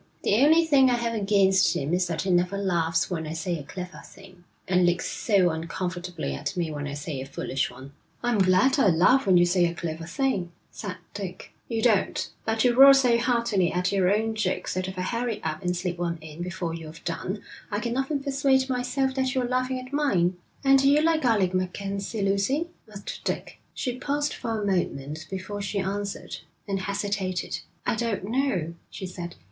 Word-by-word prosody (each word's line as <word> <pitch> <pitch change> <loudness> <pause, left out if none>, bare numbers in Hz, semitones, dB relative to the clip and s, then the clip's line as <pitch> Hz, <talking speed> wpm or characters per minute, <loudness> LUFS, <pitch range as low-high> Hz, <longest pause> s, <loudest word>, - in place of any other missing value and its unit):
The 205 - +3
only 320 +3 +6
thing 275 -4 +5
I 245 - +3
have 235 -1 -1
against 195 -3 +3
him 145 +4 -1
is 180 0 +2
that 175 - -2
he 190 - 0
never 180 +2 +2
laughs 170 -3 0
when 160 -3 -2
I 155 - -4
say 170 0 -2
a - - -7
clever 180 +5 -8
thing, 185 -2 -16 0.2
and 180 0 +3
looks 175 0 +2
so 190 -5 +2
uncomfortably 175 - -4
at 70 - -4
me 170 -3 -1
when 145 -1 -4
I 140 - -5
say 145 -2 -4
a - - -5
foolish 135 -1 -2
one.' 135 +1 -11 0.3
'I'm 240 -3 +1
glad 190 +9 +4
I 270 - +5
laugh 190 +9 +4
when 185 -2 +6
you 175 - +6
say 175 0 +3
a 170 0 -1
clever 165 -1 -5
thing,' 190 -4 -1 0.2
said 200 -4 -6 0.2
Dick. 190 -2 -7
'You 225 -2 -2
don't. 215 -5 +2 0.2
But 220 0 +1
you 245 -1 +4
roar 275 +2 +9
so 250 -3 +4
heartily 235 -7 +1
at 180 +1 0
your 190 -2 +3
own 220 +2 +1
jokes 210 -4 -1
that 185 0 -2
if 190 0 -7
I 180 - -1
hurry 230 +1 -2
up 160 +2 -3
and 180 -1 -1
slip 180 -1 -3
one 170 -1 -1
in 155 +1 -9
before 175 -2 -3
you've 160 -1 -9
done, 185 +4 -4 0.3
I 205 - -1
can 235 +1 -2
often 275 +2 -1
persuade 270 -1 +2
myself 260 +1 0
that 265 0 -1
you're 255 -1 +1
laughing 255 +1 0
at 255 +2 -10
mine.' 190 -12 +2 0.3
'And 270 0 +6
do 275 +1 +4
you 295 +2 +4
like 320 -3 +2
Alec 200 -6 +3
MacKenzie, 195 +3 -2
Lucy?' 200 +12 +1 0.2
asked 200 -1 -7
Dick. - - -4 0.2
She 250 -2 -3
paused 290 +1 -1
for 225 -2 -3
a 205 - -2
moment 155 -5 -2
before 195 +2 -5
she 200 +1 -3
answered, 200 +1 -3 0.3
and 195 -1 -1
hesitated. 200 -1 -2 0.3
'I - - +1
don't 230 -5 -1
know,' 205 - 0 0.2
she 190 - -7
said. 175 -2 -7
195 Hz, 200 wpm, -26 LUFS, 175-240 Hz, 0.3 s, roar